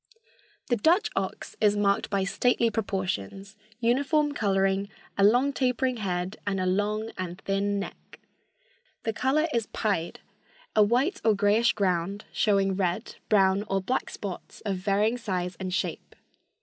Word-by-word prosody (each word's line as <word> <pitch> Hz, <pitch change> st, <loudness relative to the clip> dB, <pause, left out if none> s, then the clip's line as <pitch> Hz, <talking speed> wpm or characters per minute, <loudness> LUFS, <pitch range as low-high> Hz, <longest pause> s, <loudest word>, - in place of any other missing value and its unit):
The 240 Hz, -, +2 dB
Dutch 340 Hz, -, +3 dB
ox -, -, -3 dB
is 210 Hz, -1 st, +4 dB
marked 200 Hz, -1 st, +1 dB
by 200 Hz, -1 st, +1 dB
stately 230 Hz, +4 st, +2 dB
proportions, 195 Hz, -, -3 dB, 0.2 s
uniform 285 Hz, +5 st, +2 dB
coloring, 195 Hz, -5 st, +1 dB, 0.3 s
a 200 Hz, -, +2 dB
long, 245 Hz, +7 st, +4 dB
tapering 255 Hz, -1 st, 0 dB
head 185 Hz, -1 st, -2 dB
and 195 Hz, -1 st, 0 dB
a 185 Hz, -, 0 dB
long 210 Hz, +4 st, 0 dB
and 180 Hz, 0 st, -4 dB
thin 200 Hz, +1 st, 0 dB
neck. 200 Hz, -, -9 dB, 0.8 s
The 225 Hz, -, -1 dB
color 270 Hz, +7 st, +2 dB
is 230 Hz, -2 st, 0 dB
pied, 195 Hz, -6 st, -2 dB, 0.6 s
a 215 Hz, -, +6 dB
white 255 Hz, -, +2 dB
or 220 Hz, -2 st, +4 dB
grayish 205 Hz, +4 st, +3 dB
ground 195 Hz, 0 st, -1 dB
showing 195 Hz, -2 st, +2 dB
red, 190 Hz, +4 st, -2 dB
brown 195 Hz, -2 st, +4 dB
or 195 Hz, -, +1 dB
black 220 Hz, +7 st, -2 dB
spots 195 Hz, -3 st, -7 dB
of 200 Hz, -3 st, -2 dB
varying 210 Hz, +5 st, +1 dB
size 180 Hz, -5 st, -2 dB
and 185 Hz, -1 st, -3 dB
shape. 180 Hz, -, -3 dB
205 Hz, 145 wpm, -27 LUFS, 195-230 Hz, 0.8 s, a